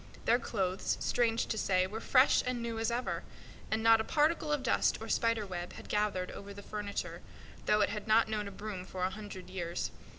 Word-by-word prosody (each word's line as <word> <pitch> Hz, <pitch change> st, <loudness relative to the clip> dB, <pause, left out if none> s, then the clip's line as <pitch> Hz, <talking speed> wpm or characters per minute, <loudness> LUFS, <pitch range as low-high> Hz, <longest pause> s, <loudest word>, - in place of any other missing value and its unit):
Their 240 Hz, +2 st, +4 dB
clothes, 190 Hz, -6 st, -1 dB
strange 230 Hz, -2 st, +1 dB
to 220 Hz, -, -2 dB
say, 185 Hz, -2 st, +2 dB
were 215 Hz, +4 st, -5 dB
fresh 255 Hz, +3 st, +5 dB
and 250 Hz, -1 st, -1 dB
new 230 Hz, -1 st, -3 dB
as 225 Hz, -, +1 dB
ever; 240 Hz, +2 st, -1 dB, 0.5 s
and 220 Hz, 0 st, 0 dB
not 225 Hz, -1 st, +7 dB
a -, -, -2 dB
particle 305 Hz, +3 st, +2 dB
of 295 Hz, -3 st, 0 dB
dust 250 Hz, -, +2 dB
or 225 Hz, -, -7 dB
spider 230 Hz, -1 st, +1 dB
web 180 Hz, -2 st, -5 dB
had -, -, -11 dB
gathered 210 Hz, -3 st, 0 dB
over 200 Hz, 0 st, -9 dB
the 200 Hz, -, -9 dB
furniture, 205 Hz, -1 st, -4 dB, 0.5 s
though 210 Hz, 0 st, +4 dB
it 205 Hz, -, +3 dB
had 210 Hz, +1 st, -5 dB
not 220 Hz, +1 st, +5 dB
known 210 Hz, -1 st, -2 dB
a -, -, -6 dB
broom 200 Hz, -1 st, -6 dB
for 185 Hz, 0 st, -5 dB
a 185 Hz, -, +1 dB
hundred 205 Hz, -2 st, -8 dB
years. 175 Hz, -2 st, -3 dB
215 Hz, 210 wpm, -32 LUFS, 195-230 Hz, 0.5 s, not